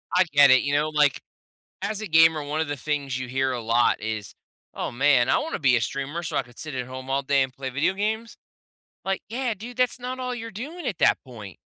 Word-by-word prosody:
I 185 Hz, -, +6 dB
get 145 Hz, -2 st, +7 dB
it, 130 Hz, -, +6 dB
you 140 Hz, 0 st, -2 dB
know? 150 Hz, +1 st, +2 dB
Like, 150 Hz, -3 st, +2 dB, 0.6 s
as 215 Hz, -1 st, -2 dB
a 215 Hz, -, -4 dB
gamer, 160 Hz, -2 st, +5 dB
one 150 Hz, +2 st, -2 dB
of 160 Hz, -, -1 dB
the 145 Hz, -, -3 dB
things 140 Hz, -2 st, -2 dB
you 130 Hz, -, -5 dB
hear 130 Hz, +1 st, 0 dB
a 120 Hz, -, -3 dB
lot 115 Hz, +2 st, +2 dB
is, 105 Hz, -2 st, -5 dB, 0.4 s
"Oh -, -, -3 dB
man 130 Hz, -1 st, +3 dB
I -, -, +4 dB
wanna 325 Hz, -, -3 dB
be 130 Hz, -5 st, +4 dB
a 115 Hz, -, +1 dB
streamer 140 Hz, +7 st, -3 dB
so 155 Hz, -2 st, -4 dB
I -, -, +2 dB
could 120 Hz, -1 st, -19 dB
sit 155 Hz, -3 st, -6 dB
at 125 Hz, -1 st, -3 dB
home 130 Hz, +1 st, -8 dB
all 140 Hz, +1 st, +1 dB
day 140 Hz, 0 st, +2 dB
and 130 Hz, -, -3 dB
play 130 Hz, 0 st, -6 dB
video 150 Hz, +8 st, 0 dB
games." 220 Hz, +3 st, -2 dB, 0.7 s
Like, 195 Hz, 0 st, -1 dB
"Yeah 245 Hz, 0 st, -1 dB
dude, 230 Hz, +5 st, -10 dB
that's 250 Hz, -1 st, +1 dB
not 255 Hz, +1 st, -5 dB
all 250 Hz, -1 st, -3 dB
you're 230 Hz, -1 st, -6 dB
doing 280 Hz, -, -6 dB
at 195 Hz, -, -3 dB
that -, -, +4 dB
point." 110 Hz, -8 st, -10 dB
145 Hz, 245 wpm, -25 LUFS, 130-210 Hz, 0.7 s, get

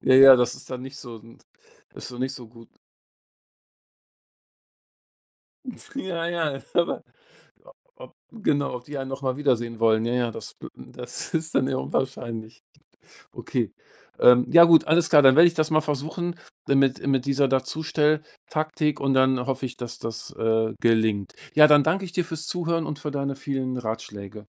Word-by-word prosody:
Ja, 130 Hz, -, +3 dB
ja, 135 Hz, 0 st, +9 dB
das 125 Hz, -1 st, 0 dB
ist -, -, -13 dB
dann 125 Hz, -1 st, -6 dB
nicht 135 Hz, +1 st, -9 dB
so 120 Hz, -5 st, -10 dB
nt 115 Hz, +2 st, -19 dB, 0.5 s
ist -, -, -8 dB
so 125 Hz, 0 st, -10 dB
nicht 130 Hz, +2 st, -2 dB
so 125 Hz, -, -10 dB
gut. 115 Hz, 0 st, -17 dB, 3.0 s
Nt 255 Hz, -, -8 dB
Ja, 175 Hz, -9 st, -3 dB
ja, 160 Hz, -5 st, -2 dB
oder 175 Hz, -1 st, 0 dB, 0.6 s
o -, -, -16 dB, 0.3 s
ob -, -, -13 dB, 0.2 s
genau, 145 Hz, -, -1 dB
ob 125 Hz, -, -11 dB
die 145 Hz, -1 st, -7 dB
einen 135 Hz, -, -5 dB
noch 135 Hz, +1 st, -7 dB
mal 130 Hz, -1 st, -1 dB
wiedersehen 120 Hz, -5 st, -1 dB
wollen. 110 Hz, -1 st, +3 dB
Ja, 120 Hz, -, -2 dB
ja, 120 Hz, -1 st, 0 dB
das, -, -, -9 dB
äh, -, -, -6 dB
m 65 Hz, -, -14 dB
das -, -, -6 dB
ist 160 Hz, 0 st, -2 dB
dann 130 Hz, -1 st, +2 dB
eher 130 Hz, -1 st, -2 dB
unwahrscheinlich. 115 Hz, -4 st, -5 dB, 0.7 s
Okay, -, -, -3 dB, 0.5 s
ähm, 125 Hz, 0 st, +6 dB
ja 170 Hz, -, +9 dB
gut, 165 Hz, -1 st, +5 dB
alles 170 Hz, +2 st, +3 dB
klar. 150 Hz, -3 st, +7 dB
Dann 135 Hz, -2 st, +6 dB
werde 165 Hz, +3 st, +8 dB
ich 170 Hz, -, -1 dB
das 155 Hz, -1 st, -1 dB
mal 155 Hz, 0 st, +3 dB
versuchen 155 Hz, +4 st, -4 dB, 0.3 s
dann 140 Hz, 0 st, +2 dB
mit 135 Hz, -1 st, +1 dB
mit 135 Hz, -2 st, +1 dB
dieser 140 Hz, 0 st, +1 dB
Dazustell-Taktik 155 Hz, +2 st, -1 dB
und 135 Hz, -1 st, 0 dB
dann 130 Hz, -1 st, +2 dB
hoffe 135 Hz, 0 st, -3 dB
ich, 125 Hz, -1 st, -7 dB
dass 120 Hz, -1 st, -7 dB
das, 115 Hz, 0 st, -7 dB
äh, 110 Hz, 0 st, 0 dB
gelingt. 110 Hz, -4 st, +1 dB, 0.2 s
Ja, 150 Hz, 0 st, +7 dB
dann 150 Hz, -1 st, +6 dB
danke 185 Hz, +6 st, 0 dB
ich 175 Hz, -, -10 dB
dir 180 Hz, -1 st, -1 dB
fürs 160 Hz, -2 st, -6 dB
Zuhören 170 Hz, -2 st, -2 dB
und 150 Hz, -1 st, -6 dB
für 150 Hz, 0 st, -5 dB
deine 140 Hz, -1 st, -3 dB
vielen 135 Hz, -2 st, -4 dB
Ratschläge. 105 Hz, -3 st, -7 dB
135 Hz, 180 wpm, -24 LUFS, 125-155 Hz, 3.0 s, ja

